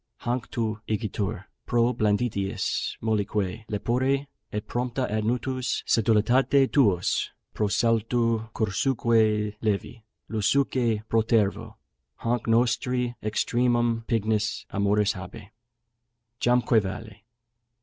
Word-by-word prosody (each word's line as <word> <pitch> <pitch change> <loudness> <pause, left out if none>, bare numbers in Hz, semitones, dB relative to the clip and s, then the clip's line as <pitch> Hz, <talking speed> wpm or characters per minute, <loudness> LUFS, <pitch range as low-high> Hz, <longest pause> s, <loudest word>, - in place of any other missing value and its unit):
Hanc 120 0 -2
tu 110 -2 -2
igitur, 105 -2 -2 0.2
pro 120 +1 +2
blanditiis 105 -2 -1
mollique 105 -1 -1
lepore, 130 +6 0 0.3
Et 105 +1 -4
prompta 125 +1 -2
ad 110 0 -1
nutus 125 +2 -1
sedulitate 120 +5 +3
tuos, 100 -11 +2 0.2
Pro 105 - 0
saltu 115 +1 +1
cursuque 110 -1 +1
levi, 110 +2 -2 0.2
lusuque 115 0 +1
protervo, 110 -2 +1 0.4
Hanc 120 0 -2
nostri 125 +1 +1
extremum 120 +1 +1
pignus 110 -1 0
amoris 100 +1 +2
habe. 95 +2 -10 0.9
Jamque 120 -2 +3
vale! 105 +2 -7
115 Hz, 90 wpm, -26 LUFS, 105-120 Hz, 0.9 s, sedulitate